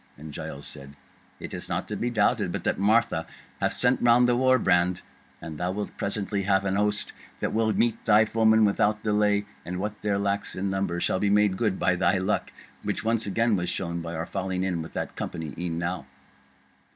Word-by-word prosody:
And 75 Hz, +1 st, -9 dB
Giles 70 Hz, +1 st, -7 dB
said: 70 Hz, +1 st, -10 dB, 0.4 s
"It -, -, -7 dB
is -, -, -6 dB
not -, -, -2 dB
to -, -, -3 dB
be 120 Hz, -, -1 dB
doubted 110 Hz, -4 st, +1 dB
but -, -, -4 dB
that -, -, 0 dB
Martha 100 Hz, -5 st, +2 dB, 0.3 s
hath -, -, +1 dB
sent 125 Hz, +1 st, +3 dB
round 120 Hz, +1 st, +5 dB
the 120 Hz, -, +3 dB
war 130 Hz, +1 st, +4 dB
brand, 90 Hz, -4 st, +2 dB, 0.4 s
and 80 Hz, 0 st, -8 dB
thou 90 Hz, -, -1 dB
wilt 105 Hz, +1 st, -5 dB
presently 100 Hz, 0 st, -2 dB
have 95 Hz, 0 st, +2 dB
an 95 Hz, -1 st, 0 dB
host 105 Hz, +1 st, 0 dB, 0.3 s
that -, -, -2 dB
will 110 Hz, 0 st, +2 dB
meet 115 Hz, +1 st, 0 dB
thy 110 Hz, +1 st, +5 dB
foemen 110 Hz, 0 st, +4 dB
without 105 Hz, +1 st, +1 dB
delay; 105 Hz, -1 st, +2 dB, 0.2 s
and 90 Hz, +1 st, -5 dB
what 105 Hz, +2 st, -4 dB
there 100 Hz, -1 st, 0 dB
lacks 100 Hz, 0 st, -2 dB
in 95 Hz, +1 st, -2 dB
number 95 Hz, -3 st, -1 dB
shall 95 Hz, -, 0 dB
be 100 Hz, -, +1 dB
made 105 Hz, -1 st, +3 dB
good 100 Hz, -2 st, 0 dB
by 90 Hz, -, +2 dB
thy 95 Hz, +2 st, +2 dB
luck, 95 Hz, +3 st, -1 dB, 0.3 s
which -, -, -3 dB
once 115 Hz, -1 st, 0 dB
again 115 Hz, +2 st, +2 dB
was 90 Hz, -2 st, -1 dB
shown 85 Hz, -2 st, -3 dB
by 85 Hz, 0 st, -5 dB
our 80 Hz, +1 st, -3 dB
falling 95 Hz, -1 st, -3 dB
in 90 Hz, -3 st, -1 dB
with 80 Hz, -, -9 dB
that -, -, -4 dB
company 80 Hz, -3 st, -5 dB
e'en 85 Hz, -1 st, -3 dB
now." 85 Hz, -4 st, -3 dB
100 Hz, 210 wpm, -26 LUFS, 90-110 Hz, 0.4 s, round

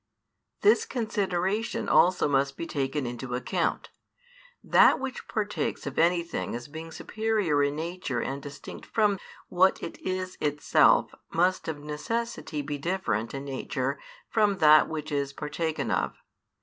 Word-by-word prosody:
This 430 Hz, +2 st, +5 dB
consideration 210 Hz, -, -1 dB
also 180 Hz, -2 st, +4 dB
must 140 Hz, -1 st, +1 dB
be 170 Hz, -, -4 dB
taken 140 Hz, -2 st, -2 dB
into 120 Hz, +1 st, -4 dB
account. 125 Hz, -, -1 dB, 0.7 s
That -, -, +6 dB
which 265 Hz, -1 st, -5 dB
partakes 210 Hz, -8 st, -2 dB
of 140 Hz, -, -3 dB
anything 170 Hz, -4 st, +1 dB
as 120 Hz, 0 st, -6 dB
being 160 Hz, +2 st, -8 dB
superior 215 Hz, -8 st, 0 dB
in 140 Hz, 0 st, +1 dB
nature 165 Hz, -5 st, -3 dB
and 135 Hz, +1 st, -3 dB
distinct 140 Hz, 0 st, -9 dB
from 210 Hz, -3 st, +2 dB, 0.3 s
what 185 Hz, +2 st, +3 dB
it -, -, -6 dB
is 185 Hz, 0 st, -4 dB
itself 150 Hz, 0 st, +3 dB, 0.2 s
must 180 Hz, +3 st, +1 dB
of 160 Hz, -2 st, -2 dB
necessity 155 Hz, 0 st, -3 dB
be 145 Hz, 0 st, -4 dB
different 140 Hz, -, -1 dB
in 135 Hz, +1 st, -5 dB
nature 135 Hz, 0 st, -3 dB, 0.3 s
from 210 Hz, -3 st, +2 dB
that 155 Hz, -3 st, +7 dB
which 155 Hz, -1 st, -5 dB
is 140 Hz, -1 st, -1 dB
partaken 155 Hz, +2 st, -3 dB
of. -, -, 0 dB
160 Hz, 135 wpm, -27 LUFS, 140-190 Hz, 0.7 s, that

